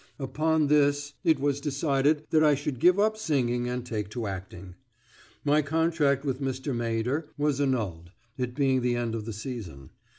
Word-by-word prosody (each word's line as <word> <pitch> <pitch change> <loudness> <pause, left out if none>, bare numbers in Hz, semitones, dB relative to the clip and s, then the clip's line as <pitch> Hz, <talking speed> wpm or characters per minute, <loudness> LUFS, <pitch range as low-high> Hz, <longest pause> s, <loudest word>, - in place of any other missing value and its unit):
Upon 155 +3 +1
this 145 0 +2
is 160 -2 +4
was 140 0 0
decided 145 +1 +1
that 155 0 +4
I 150 -1 +5
should 140 -2 -4
give 180 +6 +5
up 215 +1 +2
singing 125 - 0
and 125 0 -3
take 105 -4 -3
to 115 +1 -4
acting. 95 -1 -7 0.7
My 150 +1 +4
contract 150 -2 +1
with 135 -1 -2
Mr. 130 0 -2
Maeder 120 +6 -1
was 145 -1 +1
annulled, 105 -12 -1 0.3
it 125 -1 -3
being 135 -2 +2
the 120 0 +1
end 120 -1 -2
of 110 -2 -4
the 115 - -4
season. 100 - -7
135 Hz, 170 wpm, -27 LUFS, 120-150 Hz, 0.7 s, I